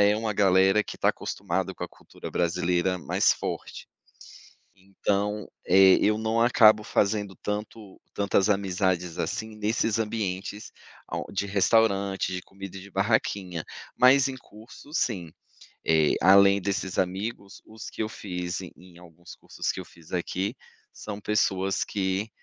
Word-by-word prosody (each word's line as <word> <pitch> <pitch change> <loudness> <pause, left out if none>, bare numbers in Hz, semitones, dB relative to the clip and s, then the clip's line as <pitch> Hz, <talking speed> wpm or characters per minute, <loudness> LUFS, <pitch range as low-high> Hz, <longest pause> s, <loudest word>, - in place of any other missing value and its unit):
é 100 0 +5
uma 110 0 -2
galera 95 +1 +4
que - - -7
está - - +2
acostumada - - -2
com - - -9
a - - -3
cultura - - -11
brasileira 90 +1 0
mais 85 - +2
forte, - - -6 0.9
então, 100 +2 -2 0.2
eh, 95 +1 +7
eu 105 +1 +3
não 110 +1 0
acabo 110 -2 +6
fazendo 100 -2 0
tanto 105 -1 -6
tantas 100 0 +1
amizades 95 -3 0
assim 110 0 -3
nesses 110 +1 0
ambientes 105 -1 -4 0.3
ao - - -4
de 100 +1 -2
restaurante, 100 -1 +2
de 90 -1 -4
comida 95 0 -10
de 100 +1 -13
barraquinha, 95 -4 -1 0.3
mas 130 +2 +6
em 135 - -5
curso, 115 +3 -15
sim, 95 - -1 0.6
eh, 80 -2 +4
além 100 +2 +6
desses 95 -1 -2
amigos, 100 +2 -3
os 110 0 -10
que - - -4
eu 110 - -3
fiz 90 -4 -5
e 90 - -9
em 90 -1 -17
alguns 85 0 -14
cursos - - -4
que - - -7
eu 95 - -7
fiz 80 -1 -18
aqui, 90 +2 -2 0.4
são 105 -1 -7
pessoas 95 -2 0
que, 95 +1 -2
100 Hz, 145 wpm, -26 LUFS, 95-105 Hz, 0.9 s, eh